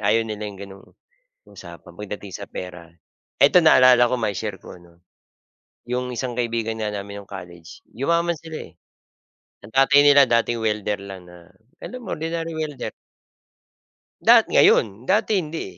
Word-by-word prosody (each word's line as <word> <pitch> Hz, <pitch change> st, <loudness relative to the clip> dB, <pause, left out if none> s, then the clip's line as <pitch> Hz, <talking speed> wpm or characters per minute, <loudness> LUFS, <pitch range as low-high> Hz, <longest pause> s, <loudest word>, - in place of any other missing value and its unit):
Ayaw 110 Hz, +3 st, +2 dB
nila 105 Hz, -1 st, -6 dB
yung 100 Hz, -, -11 dB
gano'ng 95 Hz, 0 st, -14 dB, 0.6 s
usapan -, -, -13 dB
pagdating 105 Hz, -2 st, -8 dB
sa -, -, -8 dB
pera. 90 Hz, -2 st, -9 dB, 0.6 s
Eto, 140 Hz, +6 st, +6 dB
naalala 125 Hz, -4 st, +6 dB
ko, 120 Hz, -, -1 dB
mai-share 105 Hz, -2 st, -3 dB
ko, -, -, -12 dB
no. 85 Hz, 0 st, -22 dB, 0.9 s
Yung 125 Hz, +1 st, -3 dB
isang 125 Hz, 0 st, -4 dB
kaibigan 115 Hz, -2 st, -2 dB
nga 110 Hz, -1 st, -3 dB
namin 100 Hz, 0 st, -7 dB
nung 100 Hz, -, -26 dB
college, 85 Hz, -3 st, -11 dB, 0.2 s
yumaman 170 Hz, +6 st, 0 dB
sila, 160 Hz, 0 st, -9 dB
eh. 85 Hz, -, -26 dB, 0.9 s
Ang 100 Hz, -, -12 dB
tatay 135 Hz, +2 st, +5 dB
nila 145 Hz, -1 st, +6 dB
dating 115 Hz, -1 st, 0 dB
welder 105 Hz, -1 st, -1 dB
lang 95 Hz, -3 st, -10 dB
na, 85 Hz, -1 st, -16 dB, 0.3 s
alam 250 Hz, 0 st, -8 dB
mo, -, -, -5 dB
ordinary 165 Hz, +1 st, -4 dB
welder. 155 Hz, -3 st, -5 dB, 1.3 s
Dat -, -, +5 dB
ngayon 105 Hz, +3 st, +3 dB
dati 210 Hz, +3 st, +1 dB
hindi, 160 Hz, -2 st, -5 dB
115 Hz, 150 wpm, -22 LUFS, 100-140 Hz, 1.3 s, Eto